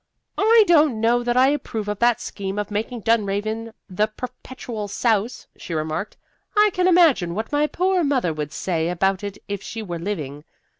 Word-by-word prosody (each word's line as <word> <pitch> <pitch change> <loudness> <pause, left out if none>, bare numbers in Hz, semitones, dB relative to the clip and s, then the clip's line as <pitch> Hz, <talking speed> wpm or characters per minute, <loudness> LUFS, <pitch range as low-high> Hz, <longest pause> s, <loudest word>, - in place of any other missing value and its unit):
"I 445 +2 +6
don't 305 - +4
know 235 +2 +3
that 240 0 0
I 260 +1 +6
approve 230 -7 -3
of 205 -1 -3
that 240 -1 +3
scheme 195 -1 -5
of 210 0 -3
making 225 +3 -3
Dunraven 220 +1 0 0.2
the 210 +2 0
Perpetual 245 -1 -7
Souse," 220 +2 0
she 170 - -6
remarked. 155 +6 -3 0.4
"I 420 0 +5
can 365 0 +2
imagine 315 - +4
what 220 +2 -4
my 295 +1 +2
poor 370 +2 +1
mother 260 - +1
would 150 -1 -4
say 165 -1 -1
about 190 +2 0
it 200 -1 -5
if 200 -1 -4
she 225 +2 -6
were 175 -4 -5
living. 150 -6 -5
220 Hz, 180 wpm, -22 LUFS, 195-255 Hz, 0.4 s, I